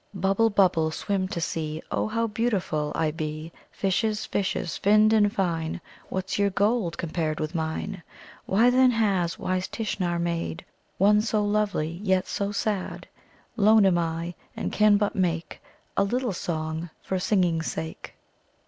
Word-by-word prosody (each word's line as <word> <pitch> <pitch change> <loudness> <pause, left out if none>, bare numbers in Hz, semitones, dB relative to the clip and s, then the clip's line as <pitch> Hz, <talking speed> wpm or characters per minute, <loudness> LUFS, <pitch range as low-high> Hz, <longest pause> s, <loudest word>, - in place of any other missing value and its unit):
"Bubble, 195 +4 +2
Bubble, 185 -6 +3
Swim 190 +4 -2
to 175 - -4
see 155 -1 -3
Oh, - - 0
how 230 +1 0
beautiful 210 -9 -1
I 160 -1 +1
be. 155 +1 -5 0.2
"Fishes, 210 +2 0
Fishes, 190 -4 -2
Finned 215 +2 +4
and 205 -2 +4
fine, 165 -5 -1 0.3
What's 190 +1 -3
your 200 0 +3
gold 200 -2 +1
Compared 160 -2 -2
with 155 +2 -3
mine? 165 +4 -3 0.5
"Why, 225 +6 +4
then, 255 +1 +5
has 200 -8 +1
Wise 185 0 -1
Tishnar 185 -6 -2
made 170 - -3 0.3
One 210 +2 +5
so 215 -1 0
lovely, 205 -6 0
Yet 190 -3 +2
so 200 0 -2
sad? 205 -2 -2 0.5
"Lone 215 -1 +5
am 180 -2 +4
I, 165 +1 -2 0.2
And - - -2
can 210 -1 +5
but 205 0 0
make 170 -3 -1 0.3
A - - +3
little 240 +2 -1
song, 160 -1 -3
For 190 - -2
singing's 180 -4 +1
sake." 160 0 -7
190 Hz, 150 wpm, -26 LUFS, 165-210 Hz, 0.5 s, then